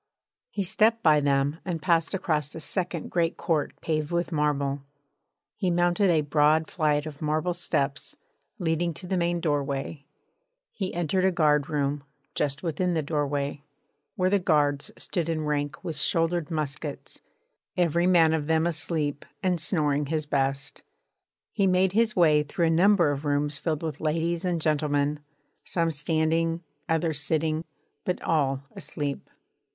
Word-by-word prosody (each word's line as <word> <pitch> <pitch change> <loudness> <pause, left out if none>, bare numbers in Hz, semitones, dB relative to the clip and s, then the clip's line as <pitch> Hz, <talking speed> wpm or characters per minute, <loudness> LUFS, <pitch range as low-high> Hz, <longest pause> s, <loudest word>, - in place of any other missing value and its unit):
He 200 - -2
stepped 220 +4 +2
by 155 -2 +6
them 140 +2 +1
and 175 -3 -3
passed 165 +2 +1
across 150 -5 -1
a - - -5
second 175 0 -3
great 170 -1 +1
court 160 -4 -1
paved 155 -2 -1
with 175 +1 -1
marble; 145 -2 0 0.7
he 185 - 0
mounted 175 +3 +2
a 160 -3 +4
broad 150 +2 +2
flight 150 -3 +1
of 150 -1 -8
marble 155 +3 0
steps 140 -4 -2 0.4
leading 170 -3 0
to 185 - -8
the 185 - -1
main 175 -1 +1
doorway; 140 -2 -2 0.6
he 190 -3 -3
entered 175 +2 0
a 190 - +4
guardroom, 150 -3 +1 0.3
just 145 0 -2
within 175 +2 0
the 160 - 0
doorway, 145 -1 -2 0.5
where 185 0 +1
the 200 - +4
guards 145 -5 +1
stood 170 -4 -3
in 155 -2 -1
rank 145 +1 -2
with 160 -5 -3
shouldered 165 +1 +1
muskets, 150 -2 -4 0.6
every 170 0 +2
man 165 -3 +5
of 150 -2 -1
them 160 0 +2
asleep 155 -3 -2 0.2
and 180 -3 +1
snoring 150 -5 +1
his 155 0 -1
best. 140 -1 -1 0.7
He 200 -3 +2
made 185 0 +3
his 220 +2 +2
way 155 -4 +5
through 150 +3 -1
a - - +3
number 175 -2 +4
of 140 0 -4
rooms 145 0 0
filled 160 -2 -2
with 155 -3 -4
ladies 165 +3 0
and 175 -2 0
gentlemen, 150 -1 +1 0.4
some 165 -2 0
standing, 165 +2 0 0.3
others 160 -2 0
sitting, 160 +1 0 0.4
but 180 - -1
all 135 -4 +1
asleep. 145 -1 -5
160 Hz, 150 wpm, -26 LUFS, 145-175 Hz, 0.7 s, by